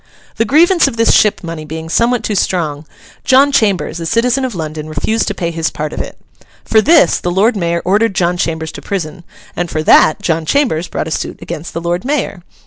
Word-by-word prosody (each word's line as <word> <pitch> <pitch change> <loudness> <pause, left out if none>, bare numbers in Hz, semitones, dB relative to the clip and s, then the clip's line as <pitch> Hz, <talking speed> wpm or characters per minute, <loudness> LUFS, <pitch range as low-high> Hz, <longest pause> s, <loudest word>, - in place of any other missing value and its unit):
The 225 - +1
grievance 330 - +4
of 230 - -4
this 230 0 +3
ship 210 -3 +3
money 165 -2 -6
being 160 +1 -7
somewhat 235 +6 +1
too 215 - -2
strong, 160 -6 -1 0.4
John 275 +2 +4
Chambers, 200 -9 0
a 165 - -4
citizen 245 +5 +1
of 255 -5 -3
London, 155 -2 -5
refused 220 +8 -1
to 205 - -2
pay 170 -3 -2
his 165 -1 -1
part 150 0 -5
of - - -3
it. - - -9 0.5
For 220 - +3
this 280 - +4
the 175 - -2
Lord 205 +6 +2
Mayor 170 -3 -1
ordered 205 +2 +1
John 175 -2 +1
Chambers 160 -2 -2
to - - -9
prison, 175 -3 -5 0.3
and 175 -1 -2
for 155 -1 -2
that 155 - +5
John 165 -1 -1
Chambers 180 - 0
brought - - -4
a - - -6
suit - - -3
against 160 +2 -7
the 165 - -3
Lord 175 +1 -2
Mayor. 255 -9 -2
180 Hz, 215 wpm, -15 LUFS, 160-230 Hz, 0.5 s, that